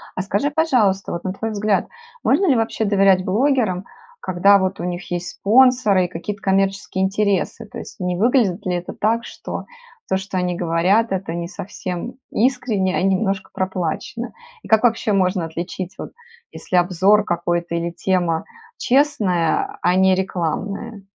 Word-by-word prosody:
А, -, -, -1 dB
скажи, 200 Hz, +9 st, -1 dB
пожалуйста, 245 Hz, -11 st, +1 dB
вот, 170 Hz, -, -4 dB
на 185 Hz, -, -2 dB
твой 225 Hz, +3 st, -4 dB
взгляд, 210 Hz, -1 st, 0 dB, 0.4 s
можно 395 Hz, -, +3 dB
ли 275 Hz, -, +4 dB
вообще 225 Hz, -1 st, 0 dB
доверять 195 Hz, -2 st, +3 dB
блогерам, 215 Hz, -4 st, +1 dB, 0.3 s
когда 195 Hz, +2 st, +4 dB
вот 190 Hz, 0 st, -1 dB
у -, -, -4 dB
них 175 Hz, +1 st, -4 dB
есть 175 Hz, 0 st, -3 dB
спонсоры 220 Hz, -4 st, +4 dB
и -, -, -3 dB
какие-то 195 Hz, +4 st, -6 dB
коммерческие 195 Hz, 0 st, 0 dB
интересы? 200 Hz, +2 st, 0 dB
То 215 Hz, -, -9 dB
есть -, -, -11 dB
не 180 Hz, -1 st, -1 dB
выглядит 210 Hz, -2 st, +2 dB
ли 180 Hz, -, 0 dB
это 175 Hz, 0 st, -5 dB
так, 230 Hz, +3 st, 0 dB
что -, -, -7 dB, 0.4 s
то, -, -, +2 dB
что 190 Hz, -1 st, -5 dB
они 180 Hz, -1 st, 0 dB
говорят,- 180 Hz, +6 st, +2 dB
это 190 Hz, -3 st, -2 dB
не 170 Hz, 0 st, -3 dB
совсем 185 Hz, +2 st, -6 dB, 0.2 s
искренне 220 Hz, -6 st, +1 dB
и -, -, 0 dB
немножко 195 Hz, 0 st, 0 dB
проплачено? 185 Hz, +6 st, -3 dB, 0.3 s
И -, -, -11 dB
как 220 Hz, +1 st, +4 dB
вообще 230 Hz, -2 st, +2 dB
можно 185 Hz, -2 st, +1 dB
отличить, 175 Hz, +3 st, -5 dB
вот, -, -, -7 dB, 0.4 s
если 180 Hz, -, -2 dB
обзор 190 Hz, +4 st, +3 dB
какой-то 175 Hz, -1 st, -1 dB
или 170 Hz, 0 st, -2 dB
тема 175 Hz, -1 st, 0 dB, 0.3 s
честная, 230 Hz, -, +1 dB
а 180 Hz, +1 st, +2 dB
не 190 Hz, 0 st, +4 dB
рекламная? 195 Hz, +4 st, -3 dB
190 Hz, 160 wpm, -20 LUFS, 180-215 Hz, 0.4 s, ли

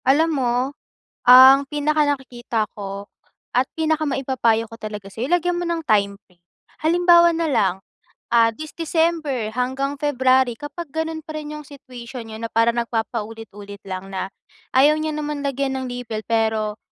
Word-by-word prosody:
Alam 310 Hz, +5 st, +4 dB
mo 255 Hz, -4 st, 0 dB, 0.8 s
ang 260 Hz, +2 st, +10 dB
pinakanakikita 285 Hz, -6 st, -1 dB
ko 200 Hz, -1 st, -7 dB, 0.5 s
at 255 Hz, +2 st, +1 dB
pinakamaipapayo 270 Hz, -7 st, 0 dB
ko 230 Hz, -, -15 dB
talaga 210 Hz, -3 st, -8 dB
sa'yo 245 Hz, +5 st, -4 dB
lagyan 355 Hz, 0 st, +1 dB
mo -, -, -2 dB
ng 330 Hz, -2 st, -2 dB
time 200 Hz, -4 st, +2 dB
frame. 180 Hz, -2 st, -30 dB, 0.4 s
Halimbawa 345 Hz, +1 st, +5 dB
nalang, 220 Hz, -, 0 dB, 0.4 s
ah, 230 Hz, -1 st, +4 dB
this 310 Hz, +6 st, -8 dB
December 320 Hz, -7 st, 0 dB
hanggang 260 Hz, +4 st, -2 dB
February, 260 Hz, -3 st, +2 dB
kapag 290 Hz, +2 st, -8 dB
ganun 320 Hz, -1 st, -3 dB
pa 310 Hz, -, -8 dB
rin 300 Hz, 0 st, -6 dB
yung 300 Hz, -, -10 dB
situation 250 Hz, -4 st, -10 dB
niyo 220 Hz, -, -7 dB
na -, -, -5 dB
para 230 Hz, +1 st, +4 dB
nagpapa 230 Hz, -1 st, -2 dB
ulit-ulit 205 Hz, -2 st, -11 dB
lang 190 Hz, +1 st, -6 dB
na 190 Hz, 0 st, -3 dB, 0.5 s
ayaw 295 Hz, +3 st, +5 dB
niya 310 Hz, -1 st, -2 dB
naman 300 Hz, -1 st, -3 dB
lagyan 275 Hz, -1 st, -2 dB
ng -, -, -4 dB
label 240 Hz, -3 st, -5 dB
pero, 220 Hz, -2 st, 0 dB
260 Hz, 150 wpm, -21 LUFS, 225-300 Hz, 0.8 s, ang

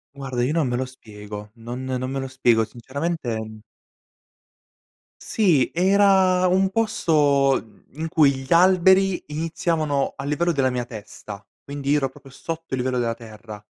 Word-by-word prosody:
Guarda, 130 Hz, -3 st, -3 dB
io 130 Hz, -, 0 dB
non 160 Hz, -3 st, +1 dB
me 125 Hz, -, -1 dB
lo 130 Hz, -, -1 dB
spiego. 105 Hz, -4 st, -10 dB
Non 120 Hz, +3 st, -7 dB
non 130 Hz, 0 st, -3 dB
me 135 Hz, -, -2 dB
lo 135 Hz, -, -4 dB
spiego. 120 Hz, -4 st, +2 dB
Sinceramente, 130 Hz, +2 st, -4 dB
mhmm 110 Hz, -1 st, -8 dB, 1.6 s
Sì 175 Hz, -, +2 dB
era 190 Hz, 0 st, +4 dB
un 190 Hz, +1 st, +2 dB
posto, 145 Hz, -10 st, +2 dB
mhmm, 110 Hz, -, -22 dB, 0.2 s
in 160 Hz, -, -2 dB
cui 155 Hz, -4 st, +4 dB
gli 130 Hz, 0 st, -9 dB
alberi 185 Hz, +1 st, +4 dB
iniziavano 155 Hz, -2 st, -1 dB
a 135 Hz, -, -7 dB
livello 170 Hz, +4 st, +1 dB
della 135 Hz, -4 st, +1 dB
mia 125 Hz, -1 st, -2 dB
testa, 105 Hz, -3 st, -10 dB, 0.2 s
quindi 140 Hz, 0 st, -2 dB
ero 135 Hz, -3 st, +1 dB
proprio 135 Hz, -, -16 dB
sotto 165 Hz, +2 st, -7 dB
il 130 Hz, -, 0 dB
livello 125 Hz, 0 st, -1 dB
della 115 Hz, -1 st, 0 dB
terra. 110 Hz, -2 st, -11 dB
135 Hz, 155 wpm, -23 LUFS, 120-165 Hz, 1.6 s, era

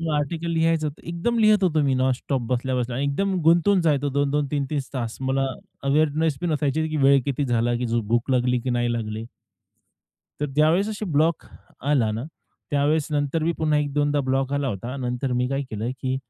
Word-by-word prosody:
मग 165 Hz, -, -2 dB
आर्टिकल 160 Hz, +3 st, -2 dB
लिहायचं 165 Hz, -1 st, +1 dB
होतं. 150 Hz, 0 st, -7 dB
एकदम 175 Hz, +8 st, -1 dB
लिहत 215 Hz, -2 st, +4 dB
होतो 160 Hz, -4 st, +2 dB
मी 135 Hz, -2 st, +2 dB
नॉनस्टॉप 130 Hz, +1 st, 0 dB
बसल्या-बसल्या 125 Hz, -1 st, -1 dB
आणि 140 Hz, +2 st, 0 dB
एकदम 190 Hz, +8 st, 0 dB
गुंतवून 170 Hz, +5 st, +4 dB
जायचो 145 Hz, -4 st, +1 dB
2-2, 145 Hz, +1 st, 0 dB
3-3 145 Hz, 0 st, -1 dB
तास. 120 Hz, -3 st, -3 dB
मला 135 Hz, +1 st, 0 dB, 0.4 s
अवेअरनेस 155 Hz, +1 st, +2 dB
बी 175 Hz, -, -2 dB
नसायची 155 Hz, 0 st, 0 dB
की 155 Hz, -, -3 dB
वेळ 140 Hz, 0 st, +6 dB
किती 140 Hz, +1 st, -1 dB
झाला 120 Hz, -1 st, +1 dB
की -, -, 0 dB
झ 115 Hz, 0 st, 0 dB
भूक 120 Hz, +3 st, +1 dB
लागली 125 Hz, -1 st, +2 dB
की 125 Hz, -, -3 dB
नाही 120 Hz, -1 st, 0 dB
लागली. 110 Hz, -1 st, -4 dB, 1.1 s
तर 150 Hz, -, 0 dB
ज्यावेळेस 165 Hz, +7 st, +3 dB
अशी 215 Hz, 0 st, -4 dB
ब्लॉक 155 Hz, +2 st, +2 dB, 0.4 s
आला 135 Hz, -6 st, +2 dB
ना, 115 Hz, +4 st, -4 dB, 0.5 s
त्यावेळेस 145 Hz, +1 st, +2 dB
नंतर 145 Hz, +2 st, 0 dB
मी 170 Hz, -, +1 dB
पुन्हा 155 Hz, -1 st, +2 dB
एक 145 Hz, -1 st, -2 dB
दोनदा 145 Hz, 0 st, +1 dB
ब्लॉक 135 Hz, 0 st, -1 dB
आला 140 Hz, -1 st, 0 dB
होता. 120 Hz, +5 st, -5 dB
नंतर 125 Hz, 0 st, -2 dB
मी 125 Hz, 0 st, 0 dB
काय 135 Hz, +1 st, -1 dB
केलं 110 Hz, +3 st, -3 dB
की, 130 Hz, -1 st, -1 dB
140 Hz, 190 wpm, -24 LUFS, 125-155 Hz, 1.1 s, वेळ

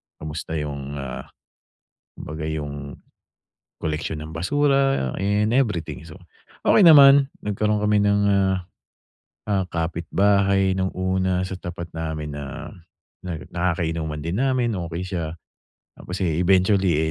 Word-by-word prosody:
kamusta 80 Hz, +1 st, -6 dB
yung, 70 Hz, -2 st, -4 dB
ah, 70 Hz, -2 st, -6 dB, 0.9 s
kumbaga 80 Hz, +1 st, -6 dB
yung 75 Hz, -2 st, -5 dB, 0.9 s
koleksyon 75 Hz, -1 st, -3 dB
ng 80 Hz, +1 st, -8 dB
basura 135 Hz, -, +1 dB
and 105 Hz, +4 st, +1 dB
everything. 105 Hz, -, -1 dB
So, 85 Hz, +3 st, -12 dB, 0.5 s
okey 205 Hz, -, +6 dB
naman, 140 Hz, -3 st, +8 dB
nagkaroon 105 Hz, +1 st, 0 dB
kami 105 Hz, 0 st, +2 dB
ng, 100 Hz, 0 st, +3 dB
ah, 95 Hz, -1 st, +2 dB, 0.9 s
ah, 95 Hz, -2 st, +1 dB
kapitbahay 95 Hz, +3 st, +1 dB
nung 95 Hz, 0 st, -1 dB
una 95 Hz, 0 st, 0 dB
sa 95 Hz, 0 st, -4 dB
tapat 85 Hz, -1 st, -7 dB
namin 80 Hz, -3 st, -5 dB
na 70 Hz, -2 st, -7 dB, 0.6 s
na 90 Hz, -2 st, -3 dB, 0.2 s
nakakainuman 80 Hz, -3 st, -2 dB
din 85 Hz, +5 st, -3 dB
namin, 130 Hz, -3 st, +1 dB, 0.2 s
okey 85 Hz, +1 st, -5 dB
siya. 85 Hz, -4 st, -4 dB, 0.7 s
Tapos, 90 Hz, -, -6 dB
eh, 80 Hz, -2 st, 0 dB
eventually, 90 Hz, -3 st, +3 dB
90 Hz, 120 wpm, -23 LUFS, 80-100 Hz, 0.9 s, naman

